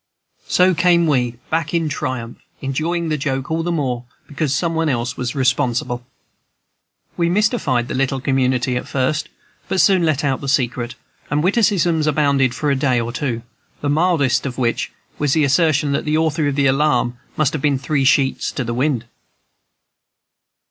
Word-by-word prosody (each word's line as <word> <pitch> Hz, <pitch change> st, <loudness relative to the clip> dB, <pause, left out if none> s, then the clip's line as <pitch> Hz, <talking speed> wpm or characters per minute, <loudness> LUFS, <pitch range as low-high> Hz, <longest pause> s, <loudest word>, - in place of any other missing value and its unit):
So 185 Hz, +1 st, +4 dB
came 170 Hz, 0 st, +3 dB
we 125 Hz, -6 st, +1 dB, 0.2 s
back 160 Hz, 0 st, 0 dB
in 165 Hz, -2 st, +1 dB
triumph, 130 Hz, -5 st, -4 dB, 0.2 s
enjoying 160 Hz, +5 st, -2 dB
the 155 Hz, -1 st, -1 dB
joke 135 Hz, 0 st, -2 dB
all 165 Hz, +1 st, 0 dB
the 175 Hz, +1 st, -2 dB
more 130 Hz, -7 st, -2 dB, 0.2 s
because 150 Hz, -1 st, -2 dB
some 165 Hz, +4 st, 0 dB
one 165 Hz, -1 st, 0 dB
else 125 Hz, -1 st, -1 dB
was 125 Hz, 0 st, -3 dB
responsible. 125 Hz, -2 st, 0 dB, 1.1 s
We 170 Hz, -1 st, +1 dB
mystified 180 Hz, -, +1 dB
the -, -, -4 dB
little 135 Hz, +1 st, 0 dB
community 130 Hz, -2 st, +1 dB
at -, -, -5 dB
first, 140 Hz, +4 st, -1 dB, 0.4 s
but 190 Hz, -, -1 dB
soon 190 Hz, -3 st, +4 dB
let 155 Hz, -3 st, +1 dB
out 135 Hz, -2 st, 0 dB
the 140 Hz, -, -3 dB
secret, 125 Hz, -3 st, 0 dB, 0.3 s
and 145 Hz, +1 st, 0 dB
witticisms 180 Hz, -6 st, +2 dB
abounded 140 Hz, -4 st, +2 dB
for 150 Hz, -2 st, 0 dB
a -, -, +2 dB
day 130 Hz, -2 st, +1 dB
or 115 Hz, 0 st, -3 dB
two, 125 Hz, -6 st, -3 dB, 0.4 s
the 145 Hz, -, -1 dB
mildest 145 Hz, -6 st, +2 dB
of 125 Hz, -, -6 dB
which 120 Hz, -2 st, -1 dB, 0.3 s
was 145 Hz, -2 st, +1 dB
the 155 Hz, -, +3 dB
assertion 145 Hz, 0 st, +2 dB
that 140 Hz, -, 0 dB
the 155 Hz, +1 st, +1 dB
author 155 Hz, -1 st, +1 dB
of 140 Hz, -, -1 dB
the 140 Hz, -1 st, +2 dB
alarm 135 Hz, -3 st, +2 dB, 0.2 s
must 150 Hz, -2 st, +2 dB
have 155 Hz, -, -3 dB
been 145 Hz, -1 st, +2 dB
"three 135 Hz, +1 st, -1 dB
sheets 135 Hz, 0 st, +2 dB
in 130 Hz, -, -1 dB
the 120 Hz, -, -2 dB
wind." 125 Hz, -1 st, 0 dB
140 Hz, 175 wpm, -19 LUFS, 130-160 Hz, 1.1 s, So